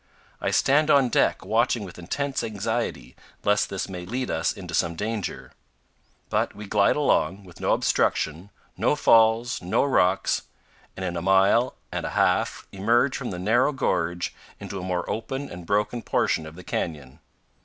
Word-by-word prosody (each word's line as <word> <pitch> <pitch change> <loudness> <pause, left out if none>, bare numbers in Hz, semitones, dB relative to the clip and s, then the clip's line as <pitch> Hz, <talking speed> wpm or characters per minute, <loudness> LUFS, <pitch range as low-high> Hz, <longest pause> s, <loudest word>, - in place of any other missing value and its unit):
I - - 0
stand 150 +3 +3
on 140 -4 +5
deck, - - +1
watching 115 0 +1
with 90 -2 -10
intense 135 +11 -2
anxiety, 110 - -3 0.3
lest 105 0 +2
this 100 - -3
may 90 -2 -7
lead 125 +7 -3
us 80 0 0
into 90 -3 -8
some 85 -1 +1
danger; 105 +2 -4 0.8
but - - 0
we 105 - -8
glide 100 0 +3
along, 100 -9 +1
with 90 -3 -15
no - - +1
obstruction, 80 +5 0 0.3
no - - +2
falls, 115 -2 +4
no 90 - +1
rocks, 95 -9 +2 0.6
and 95 - -3
in 90 -1 -3
a 85 - -2
mile 95 +7 +3 0.2
and - - -3
a - - -5
half - - +1
emerge 120 +7 +2
from 125 - -4
the 90 - -5
narrow 110 +10 +2
gorge 90 - -1 0.3
into 100 - -6
a - - -6
more 90 -1 -2
open 135 +6 -4
and 85 -1 -9
broken 105 +4 0
portion 80 -4 0
of 80 - -11
the 90 - -11
canyon. 75 -6 -4
100 Hz, 165 wpm, -25 LUFS, 90-120 Hz, 0.8 s, on